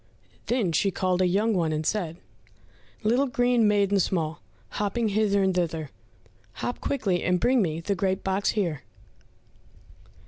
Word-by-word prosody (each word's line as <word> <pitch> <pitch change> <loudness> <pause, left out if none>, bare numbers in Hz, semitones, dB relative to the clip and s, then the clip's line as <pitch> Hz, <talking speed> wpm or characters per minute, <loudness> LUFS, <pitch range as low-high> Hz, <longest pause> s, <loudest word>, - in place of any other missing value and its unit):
Then 235 -8 +1
she 180 +5 +2
called 185 0 0
a 185 - +4
young 210 +5 +1
one 170 -5 +1
and 155 0 -2
said, 170 -5 -1 0.9
"Little 245 +6 +2
green 245 -3 +2
maiden 200 -1 +2
small, 165 -3 -1 0.3
Hopping 210 +2 -1
hither 200 -1 +2
and 190 -1 +2
thither, 165 -4 -2 0.6
Hop 245 - -4
quickly 200 -10 0
and 180 0 +1
bring 250 +5 +3
me 165 -3 -1
The 200 +4 -1
great 190 +1 -1
box 195 +1 0
here." 165 -9 -1
195 Hz, 145 wpm, -26 LUFS, 175-215 Hz, 0.9 s, a